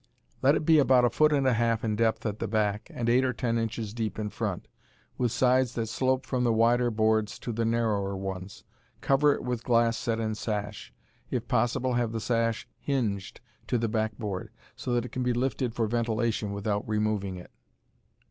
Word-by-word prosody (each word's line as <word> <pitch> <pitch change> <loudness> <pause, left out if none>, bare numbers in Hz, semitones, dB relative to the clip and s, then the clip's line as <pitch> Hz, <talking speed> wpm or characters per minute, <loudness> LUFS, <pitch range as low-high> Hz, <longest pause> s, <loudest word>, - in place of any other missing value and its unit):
Let 140 +3 +5
it 155 - -1
be 160 -1 +6
about 130 -3 +5
a 120 - +2
foot 155 +5 +4
and 140 -2 +2
a 130 - +4
half 115 -1 +1
in 110 -2 0
depth 110 0 +1
at 105 -1 -2
the 115 - -2
back, 105 -1 -1
and 120 - -3
eight 125 +2 +4
or 130 -1 +1
ten 115 -1 -1
inches 110 -2 -3
deep 110 -4 -3
in 105 -1 -3
front, - - -3 0.5
with 120 -3 +1
sides 130 0 +2
that 115 -2 -2
slope 130 +1 0
from 125 -2 -1
the 120 - +3
wider 120 +2 +3
boards 110 -1 +1
to 120 - -5
the 115 +1 -1
narrower 105 -4 0
ones. 95 0 -6 0.4
Cover 140 +1 +4
it - - -7
with 125 -2 -3
glass 115 -1 +3
set 115 -1 -1
in 110 -1 -1
sash. 105 -1 -4 0.4
If 120 -2 -3
possible 125 +1 +1
have 120 -2 0
the 115 - -2
sash 115 0 0
hinged 110 -10 -2 0.3
to 125 - +1
the 115 0 0
back 110 -1 -1
board, 105 -5 -4 0.3
so 125 - -4
that 120 0 +1
it 125 - -8
can 130 - -3
be 125 -1 +1
lifted 125 -1 -1
for 115 - +1
ventilation 115 -1 -1
without 100 +1 -2
removing 105 -3 -1
it. 90 - -12
115 Hz, 205 wpm, -28 LUFS, 110-125 Hz, 0.5 s, be